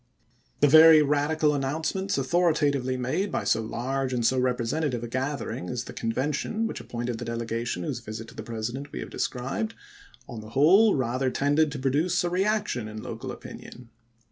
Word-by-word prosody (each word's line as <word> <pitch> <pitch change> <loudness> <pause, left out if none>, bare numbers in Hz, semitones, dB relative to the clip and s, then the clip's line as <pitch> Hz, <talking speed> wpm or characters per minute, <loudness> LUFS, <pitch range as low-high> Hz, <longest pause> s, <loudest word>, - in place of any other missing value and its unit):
The 145 - +7
very 155 +1 +8
radical 150 +1 +1
announcements 160 +8 -1
authoritatively 140 -4 +1
made 130 +11 -1
by - - -1
so 115 - +2
large 130 +4 -2
and 120 -2 0
so 130 +2 +3
representative 125 +1 -1
a - - -4
gathering 130 -7 -3
as 125 -1 -3
the - - -9
Convention 145 - -2
which - - -4
appointed 120 0 -4
the 120 - -5
delegation 115 -4 -3
whose 120 - -3
visit 115 -1 -7
to - - -13
the - - -6
President 120 +5 -5
we - - -6
have - - -8
described, 135 - -3 0.5
on 115 -2 -7
the 110 - -11
whole 195 +9 +6
rather 130 0 0
tended 145 +3 +2
to - - -4
produce 150 +8 +1
a 175 - -1
reaction 190 - 0
in 110 0 -8
local - - -6
opinion. 120 -2 -11
135 Hz, 170 wpm, -26 LUFS, 120-155 Hz, 0.5 s, very